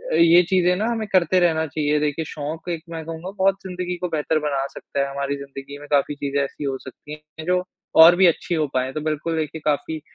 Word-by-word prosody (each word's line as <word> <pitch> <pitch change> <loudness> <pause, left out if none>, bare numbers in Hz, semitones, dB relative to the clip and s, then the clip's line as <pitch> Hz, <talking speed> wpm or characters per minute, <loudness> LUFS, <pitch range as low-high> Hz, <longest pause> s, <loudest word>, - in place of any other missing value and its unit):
ये 170 +1 +7
चीज़ें 180 -1 +3
ना 210 +4 -1
हमें 225 -2 -2
करते 185 -2 +3
रहना 160 -3 +2
चाहिए। 150 0 0
देखिए, 150 +2 -1
शौक 155 +3 -6
एक 165 -2 -3
मैं 165 -1 -6
कहूँगा 165 +3 -6
बहुत 190 +1 +3
ज़िंदगी 180 -1 -4
को 180 - -3
बेहतर 155 0 0
बना 140 -3 -1
सकता - - -6
है, 140 0 +1
हमारी 140 0 -2
ज़िंदगी 140 0 -9
में 145 - -11
काफ़ी 145 0 +2
चीज़ें 140 0 -2
ऐसी 140 - -6
हो 135 -2 -2
सकती 145 +3 -10 0.3
हैं 155 - -6
जो 180 +1 +1 0.4
और 170 +2 +8
भी 190 +1 +5
अच्छी 170 +1 0
हो 155 -1 +1
पाएँ। 130 0 0
तो 155 - -3
बिल्कुल, 155 +2 -2
देखिए 155 0 -3
काफ़ी 155 +1 -1
155 Hz, 225 wpm, -22 LUFS, 145-175 Hz, 0.4 s, और